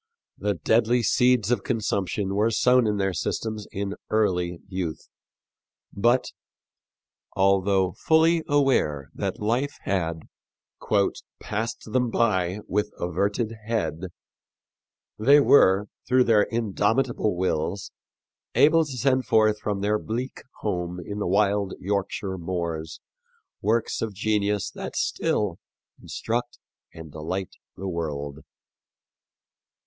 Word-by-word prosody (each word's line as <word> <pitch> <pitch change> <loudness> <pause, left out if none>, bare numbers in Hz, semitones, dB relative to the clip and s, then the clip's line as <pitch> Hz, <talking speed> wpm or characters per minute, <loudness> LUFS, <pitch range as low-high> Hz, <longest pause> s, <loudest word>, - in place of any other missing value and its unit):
The 100 0 0
deadly 115 +7 +2
seeds 125 0 +3
of 120 -5 +2
consumption 100 -4 -1
were 105 +3 +2
sown 125 +1 +4
in 105 -1 0
their 95 -1 0
systems 110 +3 -3
in 100 0 -3 0.2
early 90 -5 +1
youth, 90 -5 -4 0.9
but, 120 +5 +2 1.0
although 95 -1 +3
fully 160 - +3
aware 130 - +1
that - - -3
life 125 +7 0
had 85 -4 -1 1.2
"passed 110 +2 -3
them 125 -2 +2
by 95 -4 +1
with 105 +1 0
averted 100 +6 -1
head," 100 -6 -2 1.1
they 140 +7 +6
were, 100 -8 +5 0.2
through 130 0 +4
their 110 -4 +4
indomitable 115 0 0
wills, 90 +1 -1 0.6
able 165 +2 +5
to 140 -4 -6
send 130 +1 +1
forth 110 -1 +3
from 100 -2 -2
their 105 +1 +1
bleak 120 +5 -4 0.2
home 90 -3 -2
in 100 +4 -6
the 105 - -1
wild 100 +1 +1
Yorkshire 100 -1 -2
moors 85 -2 -4 0.6
works 110 +2 0
of 110 -3 -3
genius 105 0 0
that - - -7
still 100 -5 0 0.4
instruct 120 +2 -3 0.3
and 80 -2 -11
delight 85 +5 -4 0.3
the 95 - -5
world. 75 -5 -4
105 Hz, 110 wpm, -25 LUFS, 95-115 Hz, 1.2 s, they